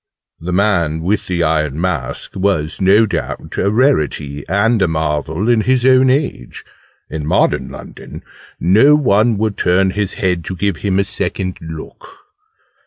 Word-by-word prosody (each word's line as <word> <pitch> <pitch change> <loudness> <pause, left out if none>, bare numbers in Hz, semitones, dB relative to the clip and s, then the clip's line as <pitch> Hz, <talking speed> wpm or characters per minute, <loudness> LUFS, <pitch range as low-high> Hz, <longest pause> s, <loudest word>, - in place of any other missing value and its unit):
'The 85 +2 -5
Man 90 -5 +1
with 100 +4 -1
the 85 -2 -1
Iron 75 -2 0
Mask' 85 -8 -3
was, 95 -4 -1
no 100 +4 +5
doubt, - - -5
a 100 - +1
rarity 75 - 0
and 105 +4 +2
a 95 - +3
marvel 80 +4 -2
in 120 -2 +3
his 125 +2 +1
own 130 0 +5
age: 135 - -2 0.5
in 80 -1 -4
modern - - +1
London - - -11 0.4
no 110 - +5
one 115 -5 +2
would 110 -1 -1
turn 95 +2 +2
his 100 0 -2
head 90 -3 -1
to 95 - -4
give 100 -1 -1
him 95 -2 -1
a 100 - +3
second 95 -2 -3
look! 80 -1 -9
95 Hz, 155 wpm, -16 LUFS, 80-105 Hz, 0.5 s, no